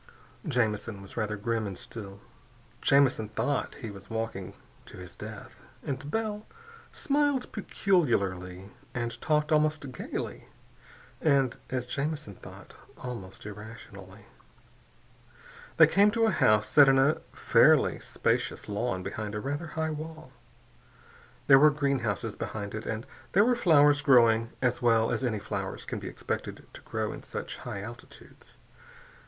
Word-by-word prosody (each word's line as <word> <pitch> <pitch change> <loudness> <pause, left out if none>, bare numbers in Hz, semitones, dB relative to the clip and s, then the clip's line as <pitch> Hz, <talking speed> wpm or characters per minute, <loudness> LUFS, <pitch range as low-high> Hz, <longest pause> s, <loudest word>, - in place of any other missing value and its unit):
Jamison 110 -6 0
was 100 - -12
rather 105 -2 -2
grim 110 +1 -1
and 95 -2 -6
still. 100 -3 -9 0.6
Jamison 130 -6 +3
thought 135 +5 -1
he 110 - -5
was 100 0 -12
walking 110 -4 -4 0.3
to - - -12
his 90 -1 -10
death. - - -10 0.2
But 140 +1 -4
Bell 215 +1 -2 0.4
smiled 285 -3 0
peculiarly 100 - 0 0.2
and 120 -1 -3
talked 150 0 +1
almost 150 -2 +1
gaily - - -6 0.7
and 135 -5 +3
as 130 -1 -2
Jamison 145 -2 -3
thought - - -13 0.2
almost 110 -8 -8
irrationally. 105 -1 -10 1.5
They - - +10
came 200 +2 +4
to 225 +2 +2
a 220 - +3
house 110 - +3
set 145 -2 +7
in 135 - +5
a 140 +3 +3
fairly - - +4
spacious - - -1
lawn 100 -2 -2
behind 105 +1 -5
a - - -2
rather 145 +8 -3
high 160 +1 -2
wall. 155 -2 -8 1.1
There 135 -1 +8
were 155 +2 +8
greenhouses 140 - -1
behind 100 -2 -5
it, 110 - -5
and 110 +2 -3 0.3
there 200 +3 +6
were 250 +1 +3
flowers 145 -9 +5
growing 115 -5 +5
as 125 0 +1
well 115 -2 +3
as - - -1
any 115 -4 0
flowers 100 - -5
can - - -4
be - - -7
expected - - -5
to - - -11
grow - - -3
in - - -9
such - - -6
high 100 - -6
altitudes. 120 +2 -13
125 Hz, 140 wpm, -29 LUFS, 105-150 Hz, 1.5 s, They